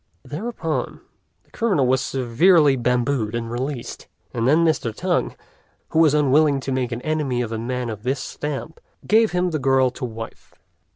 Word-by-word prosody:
Thereupon, 165 -1 -4 0.4
the - - -33
criminal 195 - +1
was 130 +1 +2
severely 140 +5 +3
bambooed 120 -2 0
and 115 -1 -4
released; 125 +1 -5 0.3
and 115 0 0
then 160 +5 +4
Mr. 155 -7 +1
Tung, 175 +10 -1 0.5
who 160 - +1
was 155 -3 +5
unwilling 145 0 +3
to 135 - -4
make 130 -2 -1
an 120 +1 -5
enemy 145 -6 -1
of 115 - -6
a 110 - -3
man 125 +1 -3
of 110 -3 -6
this 130 +4 -1
stamp, 150 +3 -5 0.3
gave 220 +1 +4
him 180 0 0
the 155 - -1
girl 130 -1 +3
to 125 - -10
wife. 115 -1 -9
135 Hz, 170 wpm, -22 LUFS, 120-155 Hz, 0.5 s, was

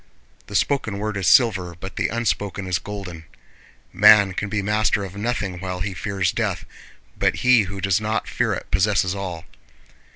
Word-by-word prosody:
The - - -8
spoken 110 -8 0
word 105 +1 -3
is 95 -2 -1
silver 95 -8 +3
but 95 +1 -8
the - - 0
unspoken 105 -4 -2
is 90 -2 -1
golden. 95 -6 -8 0.7
Man 100 0 +6
can 100 +2 -3
be 105 -1 -2
master 105 0 +1
of 95 0 -8
nothing 100 -4 -3
while 90 -1 -5
he 95 +1 -2
fears 95 +2 -1
death, - - -2 0.5
but - - +2
he 125 -4 +5
who 100 0 -6
does 95 +2 +1
not 110 +1 -2
fear - - 0
it - - -9
possesses 95 0 +2
all. 90 -4 -6
100 Hz, 170 wpm, -22 LUFS, 95-105 Hz, 0.7 s, Man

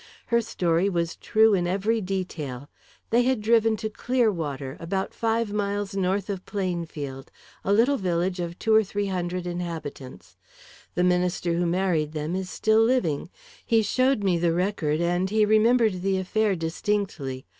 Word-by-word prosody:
Her 235 0 +2
story 180 -4 0
was 170 -3 -1
true 220 0 +3
in 175 -3 +1
every 205 +5 0
detail. 165 -9 -4 0.4
They 235 +2 +5
had 255 -1 +1
driven 225 0 +3
to 220 - -3
Clearwater, 165 - -1
about 190 +3 -3
five 225 -2 -1
miles 205 -1 -2
north 195 +1 0
of 195 -3 -4
Plainfield, 165 -8 -4 0.3
a 195 - 0
little 240 +7 +4
village 180 -1 -1
of 175 0 -4
two 220 - +1
or 220 0 +6
three 205 +1 -3
hundred 180 -1 -3
inhabitants. 165 -7 -6 0.6
The 180 - +2
minister 180 -1 +1
who 175 +1 0
married 170 -4 0
them 155 +3 -3
is 190 -1 -3
still 220 0 +2
living. 195 - +1 0.3
He 225 -1 +3
showed 255 +2 +1
me 180 -3 +2
the 170 -1 +2
record, 170 -4 0
and 175 +2 +1
he 215 +1 +3
remembered 220 -2 +3
the 190 0 +1
affair 200 +2 +1
distinctly. 165 -6 -2
190 Hz, 155 wpm, -25 LUFS, 170-215 Hz, 0.6 s, or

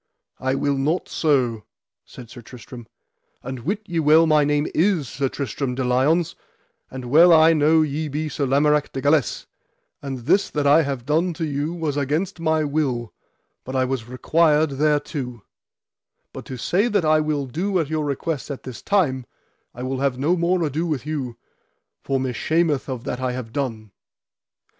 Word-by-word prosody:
I 130 0 0
will 140 0 0
not 155 +6 0
so, 125 -8 0 0.4
said 120 -2 -12
Sir 120 - -10
Tristram; 120 0 -12 0.6
and 130 -1 -6
wit 200 - -3
ye 175 -4 -2
well 160 +2 +5
my 155 -2 +4
name 145 +1 +1
is 170 -5 +1
Sir 135 +2 -2
Tristram 130 0 -3
de 130 - -2
Liones, 135 +7 +2 0.6
and 130 -1 -7
well 160 +8 +6
I 160 0 +7
know 155 +1 +4
ye 155 +1 -2
be 150 +2 -3
Sir 145 -2 -2
Lamorak 150 +2 +2
de 135 - -3
Galis, 145 -3 +1 0.6
and 135 -3 -5
this 190 +7 +3
that 145 -1 -2
I 145 +3 +6
have 135 -5 -4
done 165 +5 +1
to 160 - -2
you 150 +3 -2
was 155 -4 -2
against 150 +6 -1
my 160 -1 +1
will, 140 -6 -2 0.5
but 130 - -7
I 130 0 +2
was 125 -3 -4
required 155 +3 +2
thereto; 145 -6 -1 0.9
but - - -8
to 130 - -7
say 185 - +1
that 205 -7 +1
I 155 0 +4
will 150 -2 -1
do 185 +10 -2
at 165 -4 0
your 155 -1 0
request 145 +1 -3
as 140 - -3
at - - -18
this 130 -3 -8
time, 135 -11 0 0.5
I 125 - -6
will 130 0 -3
have 135 -2 0
no 150 +7 +1
more 175 +1 +1
ado 155 +3 -1
with 150 -5 -3
you, 135 -6 -4 0.6
for 135 -1 -1
me 130 -1 -2
shameth 155 +3 0
of 125 -3 -4
that 125 - -4
I 130 -1 -2
have 120 -3 -7
done. 115 -7 -4
145 Hz, 180 wpm, -22 LUFS, 130-160 Hz, 0.9 s, I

